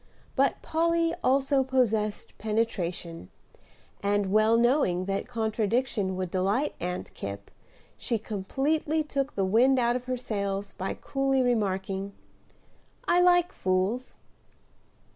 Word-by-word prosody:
But 270 Hz, -1 st, +1 dB
Polly 335 Hz, +1 st, +1 dB
also 270 Hz, +1 st, +3 dB
possessed 225 Hz, -5 st, 0 dB
penetration; 180 Hz, -, -2 dB, 0.7 s
and, 200 Hz, -1 st, +1 dB
well 215 Hz, +2 st, +4 dB
knowing 235 Hz, -7 st, +2 dB
that 195 Hz, +2 st, -2 dB
contradiction 220 Hz, -3 st, -1 dB
would 185 Hz, -2 st, -3 dB
delight 200 Hz, +10 st, 0 dB
Aunt 180 Hz, +1 st, -4 dB
Kipp, 100 Hz, 0 st, -7 dB, 0.5 s
she 230 Hz, -, -1 dB
completely 275 Hz, +10 st, -1 dB
took 280 Hz, -1 st, -3 dB
the 195 Hz, -, +1 dB
wind 245 Hz, +7 st, +4 dB
out 240 Hz, -1 st, +2 dB
of 250 Hz, 0 st, -4 dB
her 255 Hz, 0 st, -2 dB
sails, 200 Hz, -4 st, -3 dB
by 190 Hz, -, -3 dB
coolly 270 Hz, -1 st, 0 dB
remarking, 195 Hz, -4 st, -1 dB, 0.9 s
"I 355 Hz, -, +4 dB
like 355 Hz, 0 st, +4 dB
fools." 190 Hz, -, -1 dB
225 Hz, 115 wpm, -27 LUFS, 195-270 Hz, 0.9 s, well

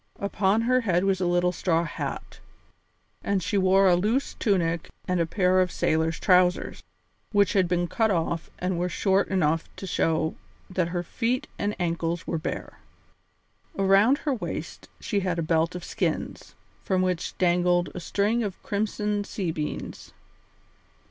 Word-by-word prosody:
Upon 200 Hz, +1 st, +1 dB
her 255 Hz, +2 st, +2 dB
head 180 Hz, -5 st, +1 dB
was 195 Hz, -1 st, +1 dB
a 180 Hz, -, +1 dB
little 175 Hz, 0 st, +2 dB
straw 170 Hz, -2 st, +1 dB
hat, 170 Hz, -, -6 dB, 0.8 s
and 195 Hz, -3 st, 0 dB
she 205 Hz, +5 st, -2 dB
wore 195 Hz, 0 st, +4 dB
a 180 Hz, -, +5 dB
loose 220 Hz, +10 st, 0 dB
tunic 170 Hz, -6 st, 0 dB, 0.2 s
and 180 Hz, -1 st, +1 dB
a 165 Hz, -, +1 dB
pair 185 Hz, 0 st, +3 dB
of 180 Hz, -1 st, 0 dB
sailor's 160 Hz, +1 st, 0 dB
trousers, 180 Hz, -1 st, +2 dB, 0.5 s
which 200 Hz, -2 st, +3 dB
had 190 Hz, -3 st, +3 dB
been 175 Hz, 0 st, 0 dB
cut 220 Hz, +5 st, +1 dB
off 170 Hz, -2 st, -1 dB
and 180 Hz, -1 st, -2 dB
were 180 Hz, +1 st, 0 dB
short 195 Hz, +2 st, +1 dB
enough 165 Hz, -4 st, 0 dB
to -, -, -7 dB
show 160 Hz, -3 st, 0 dB, 0.4 s
that 180 Hz, -2 st, 0 dB
her 175 Hz, 0 st, -3 dB
feet 240 Hz, +7 st, -1 dB
and 205 Hz, +1 st, -1 dB
ankles 170 Hz, -1 st, -1 dB
were 165 Hz, -, -2 dB
bare. 155 Hz, -, -5 dB, 1.0 s
Around 195 Hz, +7 st, +4 dB
her 290 Hz, -2 st, -1 dB
waist 245 Hz, -, -6 dB
she 205 Hz, -, -1 dB
had 180 Hz, -3 st, -1 dB
a 170 Hz, -, 0 dB
belt 165 Hz, +2 st, +1 dB
of 180 Hz, -, -6 dB
skins, -, -, -3 dB, 0.3 s
from 185 Hz, -1 st, 0 dB
which 180 Hz, -2 st, -2 dB
dangled 175 Hz, 0 st, +2 dB
a -, -, -5 dB
string 205 Hz, +6 st, 0 dB
of 200 Hz, -4 st, -5 dB
crimson 210 Hz, 0 st, -1 dB
sea 190 Hz, -4 st, -3 dB
beans. 155 Hz, -1 st, -5 dB
185 Hz, 160 wpm, -26 LUFS, 170-200 Hz, 1.0 s, a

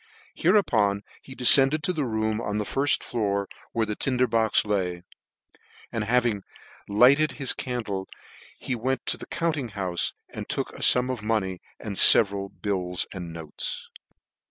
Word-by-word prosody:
Hereupon 110 Hz, -, +1 dB, 0.2 s
he 130 Hz, -, -12 dB
defcended 135 Hz, +4 st, +5 dB
to 180 Hz, -, 0 dB
the 150 Hz, -5 st, -2 dB
room 110 Hz, -1 st, -2 dB
on 105 Hz, -2 st, -3 dB
the 105 Hz, -, -1 dB
firfl 140 Hz, +5 st, 0 dB
floor, 100 Hz, -4 st, -2 dB, 0.2 s
where 115 Hz, -1 st, 0 dB
the 105 Hz, 0 st, -4 dB
tinder 130 Hz, +1 st, 0 dB
box 115 Hz, -3 st, +2 dB
lay; 90 Hz, -4 st, -2 dB, 0.9 s
and 110 Hz, -2 st, -3 dB
having 115 Hz, -3 st, +1 dB, 0.5 s
lighted 135 Hz, +8 st, +4 dB
his 135 Hz, -2 st, +1 dB
can 125 Hz, -2 st, -4 dB
dle, 95 Hz, -2 st, -5 dB, 0.5 s
he -, -, -4 dB
went 125 Hz, +2 st, -2 dB
to -, -, -1 dB
the -, -, -10 dB
'compting 155 Hz, -7 st, -2 dB
noufe, 90 Hz, -3 st, -1 dB, 0.2 s
and -, -, -7 dB
took -, -, -3 dB
a -, -, -11 dB
fum 125 Hz, +1 st, +4 dB
of 125 Hz, -4 st, -5 dB
money, 105 Hz, -4 st, -2 dB, 0.2 s
and 100 Hz, -3 st, -6 dB
feveral 100 Hz, -2 st, +6 dB, 0.2 s
noies 90 Hz, -3 st, -2 dB
and 90 Hz, -3 st, -7 dB
bills. 80 Hz, -3 st, -6 dB
110 Hz, 155 wpm, -25 LUFS, 100-130 Hz, 0.9 s, feveral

